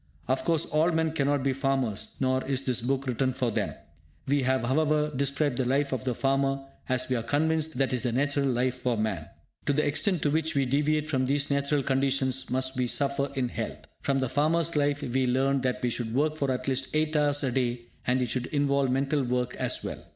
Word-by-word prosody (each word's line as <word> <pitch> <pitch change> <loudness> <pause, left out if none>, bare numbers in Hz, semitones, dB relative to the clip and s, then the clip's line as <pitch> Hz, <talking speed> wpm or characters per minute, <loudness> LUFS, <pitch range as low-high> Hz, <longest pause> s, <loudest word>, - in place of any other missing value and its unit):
Of 130 +1 0
course, 165 -1 +3
all 160 +2 +2
men 160 -1 +1
cannot 145 -2 +1
be 135 -1 +1
farmers, 130 -6 -1
nor 130 0 +1
is 135 -1 -1
this 125 -2 +1
book 135 +3 -1
written 130 +1 0
for 125 -2 -1
them. - - -2 0.5
We 140 +1 +2
have 130 -1 +1
however, 150 +3 +1
described 140 0 0
the 130 - +1
life 140 +3 +1
of 130 -1 -3
the 125 -2 0
farmer, 135 +1 0 0.2
as 130 0 +1
we 130 - 0
are 115 - 0
convinced 155 +4 0
that 135 -1 +1
it - - +2
is - - -5
the 120 0 -1
natural 140 +3 +1
life 125 0 +1
for 125 -2 -1
man. 105 -8 -2 0.4
To 145 - +3
the 150 +2 +2
extent 170 +4 +1
to 145 - +2
which 160 +1 0
we 135 -1 +2
deviate 150 +3 +1
from 130 -4 0
these 145 +1 0
natural 140 0 +1
conditions 135 0 0
must 130 +1 -1
we 125 -1 +1
suffer 140 +2 0
in 130 -2 0
health. - - -5 0.2
From 135 -1 +1
the 130 - 0
farmer's 155 +5 +1
life 145 0 +1
we 130 +1 0
learn 135 +2 +2
that 125 -1 -1
we 120 - +1
should 115 -1 -3
work 155 +3 +2
for 140 -3 -1
at 130 +1 -2
least 130 0 0
8 155 0 +1
hours 145 -1 +2
a 130 - +1
day, 120 -1 0 0.3
and 125 +1 +2
it - - -1
should 125 +2 -2
involve 140 -2 +1
mental 135 +3 +1
work 125 0 -1
as - - -1
well. - - -5
135 Hz, 225 wpm, -28 LUFS, 125-145 Hz, 0.5 s, course